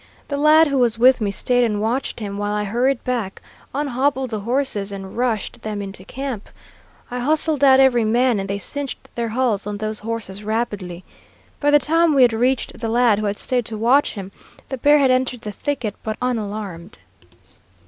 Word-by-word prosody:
The 285 - -1
lad 305 +2 +6
who 275 -1 +1
was 235 -2 +2
with 255 +1 +5
me 205 - 0
stayed 245 +5 +1
and 210 -3 0
watched 235 +6 -2
him, 200 -1 -5
while 205 0 -1
I 210 - -1
hurried 240 +5 0
back, 235 -6 -3 0.3
unhobbled 265 -2 -1
the 215 - -2
horses, 220 -3 -1
and 195 -1 -8
rushed 235 -3 -2
them 215 -1 -4
into 195 -1 -6
camp. 260 -1 -6 0.6
I 250 - -3
hustled 300 +2 +1
out 265 -1 +7
every 255 -3 +4
man, 235 +1 +2
and 195 0 -4
they 200 - -1
cinched 280 +7 -4
their 235 -1 -2
hulls 220 -4 0
on 205 0 -3
those 215 0 -3
horses 215 -3 -5
rapidly. 205 -5 -3 0.6
By 290 - +2
the 295 - +7
time 315 +3 +2
we 265 - +6
had 240 -2 +4
reached 250 +3 0
the 225 - -3
lad 235 -2 +3
who 215 - -1
had 200 0 -2
stayed 245 -3 -1
to 220 - -3
watch 245 +6 +3
him, 195 -2 -7 0.4
the 265 - -4
bear 290 +4 +5
had 270 -3 +4
entered 255 -2 0
the 210 - -5
thicket, 245 -2 -3
but 215 -1 -4
unalarmed. 210 -7 -4
235 Hz, 195 wpm, -21 LUFS, 210-265 Hz, 0.6 s, out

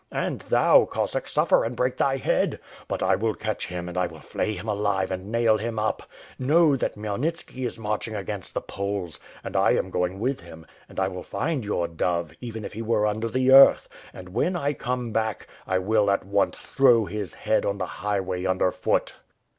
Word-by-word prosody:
And - - -2
thou, - - +4
Cossack, - - -2
suffer - - +3
and 115 +2 -3
break 125 +1 0
thy 135 0 +2
head! - - 0 0.3
But - - -2
I - - +4
will 110 +1 -1
catch 110 0 -3
him 90 -1 -5
and 90 - -7
I 90 -1 +1
will 80 -2 -12
flay 110 - -2
him 110 - -8
alive 100 -2 0
and 95 +3 -5
nail 115 -2 +3
him 115 +1 -3
up. 110 0 0 0.4
Know, 150 +3 +4
that 130 - -2
Khmyelnitski 125 +5 -3
is 115 - -7
march 105 -1 -2
ing 110 - -6
against 100 -2 -5
the - - 0
Poles, 100 -4 -4 0.2
and - - -7
I - - +4
am - - -1
going 90 +2 -1
with 130 +5 -1
him; 80 -1 -12 0.2
and - - -15
1 95 0 0
will 90 - -5
find 150 - -2
your 95 -5 -1
dove, 85 -1 -1
even 115 -3 -6
if - - -7
he 110 - -5
were 110 -2 +1
under 110 +2 -1
the 130 +2 +2
earth. 135 +1 +8 0.2
And 90 -1 -11
when 125 - 0
I 145 -4 0
come 125 -2 -3
back, 110 -2 -1 0.2
I 95 - +1
will 105 +2 +2
at 100 - +1
once 100 0 +1
throw 120 -5 +4
his 100 -1 -5
head - - +1
on 100 - -1
the 95 - -2
highway 95 -2 -2
under 95 0 +2
foot. - - -1
105 Hz, 210 wpm, -25 LUFS, 95-120 Hz, 0.4 s, earth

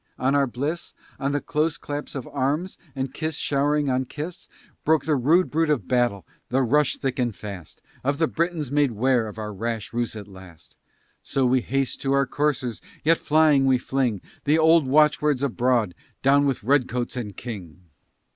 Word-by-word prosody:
on 130 +2 +1
our 140 -1 +3
bliss, 145 +7 -4 0.2
On 140 0 0
the 145 - 0
close 150 +2 -1
clasp 145 0 -6
of 135 - -4
arms 145 +7 -2 0.2
and 130 -1 -3
kiss 155 -1 -3
showering 145 0 +1
on 130 0 +1
kiss, 155 +7 -7 0.3
Broke 160 0 +2
the 155 -1 +2
rude 155 +8 +3
bruit 160 +1 +1
of 135 -11 0
battle, 120 -6 +1 0.2
the 130 +2 +2
rush 145 +3 +2
thick 135 0 -3
and 120 -4 0
fast 100 -7 -9 0.2
Of 140 +2 0
the 160 +1 +2
Britons 165 -5 -2
made 145 -4 +2
'ware 120 +1 +2
of 105 - -9
our 105 -1 -5
rash 115 +2 -4
ruse 120 -1 -1
at 105 -2 -8
last; 95 -4 -14 0.5
So 135 -1 0
we 125 0 +3
haste 135 +2 -1
to 135 0 0
our 140 0 +3
coursers, 130 -4 -1 0.2
yet 165 +2 +4
flying, 150 -3 +4
we 130 -1 +4
fling 125 -5 -1 0.2
The 150 +2 +4
old 160 -2 +5
watch 150 +3 +4
words 145 -3 +1
abroad, 120 -6 +1 0.3
"Down 140 +1 +4
with 135 -6 -1
Redcoats 125 -1 +1
and 105 -5 -5
King!" 95 - -8
135 Hz, 185 wpm, -24 LUFS, 120-150 Hz, 0.5 s, old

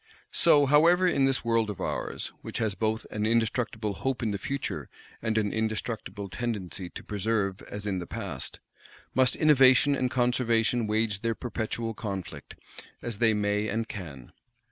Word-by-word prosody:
So, 150 -4 +5
however, 165 +6 +5
in 140 -6 +3
this 135 -3 +1
world 115 -2 +2
of 105 - -5
ours, - - -3
which - - -5
has 110 -3 0
both 110 +2 -1
an 105 0 -1
indestructible 115 -2 0
hope 130 +4 -2
in 110 - 0
the 100 - -3
Future, 140 +4 -4 0.3
and 110 0 0
an 105 -2 +1
indestructible 110 -2 -3
tendency 95 -4 -4
to - - -9
persevere 105 -1 -1
as 105 0 -6
in 95 -3 -1
the 85 - -6
Past, - - -5 0.5
must 130 0 +3
Innovation 145 -2 +6
and 130 -1 0
Conservation 120 -2 +2
wage 105 -1 +1
their 115 +1 -1
perpetual 115 -1 -3
conflict, 100 -7 -6 0.5
as 115 -4 -4
they 110 -2 +4
may 105 0 0
and 110 +2 -1
can. 75 - -8
110 Hz, 160 wpm, -28 LUFS, 105-125 Hz, 0.5 s, Innovation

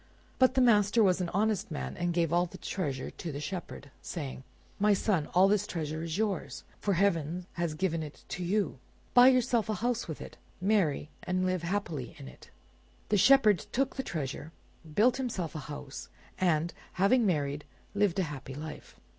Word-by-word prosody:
But 255 0 +5
the 260 - +4
master 215 -2 +5
was 185 -2 +3
an 175 - -1
honest 210 +1 0
man, 65 0 -4
and 175 0 -1
gave 170 -1 +1
all 175 +1 +3
the - - -11
treasure 140 -9 -3
to 170 - -6
the 140 - -5
Shepherd, 150 -2 -6
saying— 140 -6 -6 0.4
"My 205 0 +4
son, 185 -7 0
all 185 +2 +7
this 210 0 +2
treasure 155 -2 -3
is 165 +1 -3
yours, 190 -11 -2 0.2
for 200 -2 0
heaven 175 -2 +1
has 170 -3 -2
given 165 -1 0
it 150 -1 -9
to 180 - -4
you. 190 -5 0 0.3
Buy 245 +1 +8
yourself 245 -3 +3
a 215 - +1
house 240 +4 -1
with 160 - -5
it, - - -10 0.2
marry, 185 -7 +1
and 185 0 -1
live 185 -1 0
happily 170 - -3
in 65 - -9
it." 65 - -14 0.6
The 210 - +3
Shepherd 220 -3 +6
took 270 +1 0
the 265 - -1
treasure, 150 - -5 0.4
built 235 +10 +4
himself 210 - -3
a 155 - -4
house, 145 -1 -7 0.3
and, 170 -2 +1 0.2
having 230 +7 +4
married, 145 -4 0 0.3
lived 200 -3 +2
a 190 - +2
happy 140 -4 -6
life. 155 +2 -8
180 Hz, 180 wpm, -30 LUFS, 155-210 Hz, 0.6 s, Buy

